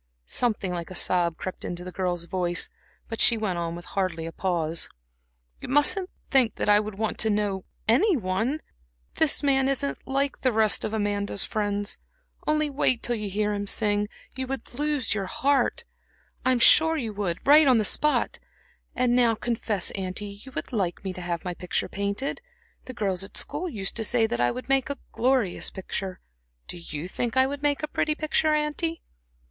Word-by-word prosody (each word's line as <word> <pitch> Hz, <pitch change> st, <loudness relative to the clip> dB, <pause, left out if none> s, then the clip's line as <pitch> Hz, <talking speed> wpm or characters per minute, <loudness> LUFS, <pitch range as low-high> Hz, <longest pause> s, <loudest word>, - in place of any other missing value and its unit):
Something 210 Hz, -, -1 dB
like 170 Hz, -1 st, -5 dB
a 185 Hz, -, -8 dB
sob 175 Hz, -2 st, +1 dB
crept 185 Hz, -, -5 dB
into 175 Hz, 0 st, -4 dB
the 180 Hz, -, -7 dB
girl's 175 Hz, -2 st, -2 dB
voice, 175 Hz, 0 st, 0 dB, 0.4 s
but 225 Hz, -, -2 dB
she 230 Hz, -, +7 dB
went 195 Hz, -5 st, -1 dB
on 170 Hz, 0 st, -3 dB
with 175 Hz, -, -9 dB
hardly 180 Hz, -4 st, -2 dB
a 165 Hz, -, -5 dB
pause: 170 Hz, -3 st, -1 dB, 0.7 s
"You -, -, -7 dB
mustn't 295 Hz, +8 st, +3 dB, 0.2 s
think 260 Hz, -5 st, +3 dB
that -, -, -2 dB
I 205 Hz, 0 st, +6 dB
would 210 Hz, -1 st, -5 dB
want 220 Hz, 0 st, -2 dB
to 220 Hz, -, +4 dB
know 205 Hz, -2 st, 0 dB, 0.2 s
any 325 Hz, -, +4 dB
one. 220 Hz, +8 st, -1 dB, 0.6 s
This 310 Hz, -1 st, +4 dB
man 270 Hz, -1 st, +3 dB
isn't 275 Hz, +1 st, 0 dB
like 275 Hz, +1 st, 0 dB
the 255 Hz, -, +3 dB
rest 220 Hz, -2 st, +3 dB
of -, -, -2 dB
Amanda's 205 Hz, -2 st, -1 dB
friends. 205 Hz, -1 st, -1 dB, 0.5 s
Only 305 Hz, 0 st, +2 dB
wait 270 Hz, -4 st, +1 dB
till 240 Hz, -, +2 dB
you 210 Hz, -2 st, -3 dB
hear 210 Hz, +2 st, 0 dB
him 205 Hz, 0 st, -3 dB
sing 205 Hz, 0 st, +2 dB, 0.3 s
you 260 Hz, 0 st, -3 dB
would 270 Hz, -1 st, -6 dB
lose 290 Hz, -3 st, 0 dB
your 195 Hz, -3 st, -2 dB
heart, 275 Hz, +5 st, +1 dB, 0.6 s
I'm 255 Hz, -1 st, +3 dB
sure, 320 Hz, +7 st, +6 dB
on 235 Hz, -, +4 dB
the 215 Hz, -, +2 dB
spot. 300 Hz, +7 st, +2 dB, 0.6 s
And 250 Hz, -1 st, +2 dB
now, 235 Hz, -2 st, +4 dB
confess, 220 Hz, -4 st, -1 dB
auntie, 200 Hz, +1 st, -5 dB
you 265 Hz, -, -11 dB
would -, -, -5 dB
like 190 Hz, -6 st, -1 dB
me 190 Hz, -1 st, -3 dB
to 180 Hz, -, -7 dB
have 175 Hz, -1 st, -3 dB
my 180 Hz, -, -2 dB
picture 180 Hz, 0 st, -2 dB
painted. 200 Hz, -, -3 dB, 0.4 s
The 255 Hz, -, -8 dB
girls 195 Hz, -4 st, -1 dB
at 195 Hz, -, -7 dB
school 365 Hz, -, -2 dB
used 200 Hz, -8 st, -3 dB
to 225 Hz, -, 0 dB
say 230 Hz, +1 st, +3 dB
that 120 Hz, -, -1 dB
I 120 Hz, -, +4 dB
would 255 Hz, -, -5 dB
make 270 Hz, -1 st, +2 dB
a 280 Hz, -, -3 dB
glorious 245 Hz, -6 st, +1 dB
picture. 190 Hz, 0 st, -5 dB, 0.5 s
Do 175 Hz, -, -6 dB
you 160 Hz, 0 st, -6 dB
think 235 Hz, +6 st, -2 dB
I 260 Hz, -, +6 dB
would 280 Hz, +1 st, -4 dB
make 290 Hz, +1 st, +1 dB
a -, -, 0 dB
pretty 305 Hz, 0 st, 0 dB
picture, 310 Hz, 0 st, +1 dB
auntie?" 305 Hz, +2 st, -1 dB
215 Hz, 185 wpm, -26 LUFS, 190-270 Hz, 0.7 s, she